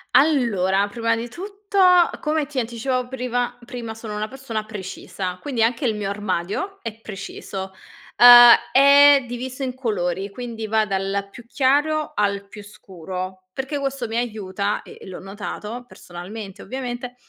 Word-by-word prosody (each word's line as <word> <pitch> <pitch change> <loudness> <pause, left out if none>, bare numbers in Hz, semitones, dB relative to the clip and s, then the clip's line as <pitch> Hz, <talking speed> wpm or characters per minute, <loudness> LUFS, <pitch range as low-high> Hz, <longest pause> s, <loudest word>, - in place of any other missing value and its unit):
Allora, 205 - +3
prima 230 +2 0
di 230 +1 -4
tutto, 400 - -5 0.4
come 305 -1 0
ti 280 -2 -4
anticipavo 245 +2 -2
priva 245 -1 -3
prima, 235 -2 -7
sono 220 -1 -7
una 210 +1 -2
persona 245 -4 -5
precisa. 190 -3 -6
Quindi 250 -6 -1
anche 235 +4 0
il 225 -3 +1
mio 210 -2 -3
armadio 205 - -3
è 230 - -4
preciso. 195 -2 -7 0.5
Uhm, 240 0 +11 0.2
è 280 0 +7
diviso 255 +2 -5
in 255 -1 -2
colori, 195 -6 -2
quindi 230 0 -6
va 220 0 +2
dal 195 0 -2
più 235 +2 -13
chiaro 295 +4 +1
al 200 -1 -1
più 205 +1 -11
scuro. 185 -2 -8
Perché 265 +5 -3
questo 275 -3 -3
mi 225 +1 -3
aiuta 210 -4 -2
e - - -13
e - - -11
l'ho 185 - -8
notato 210 +4 -7
personalmente, 195 +3 -9
ovviamente. 245 +1 -6
230 Hz, 150 wpm, -22 LUFS, 200-260 Hz, 0.5 s, Uhm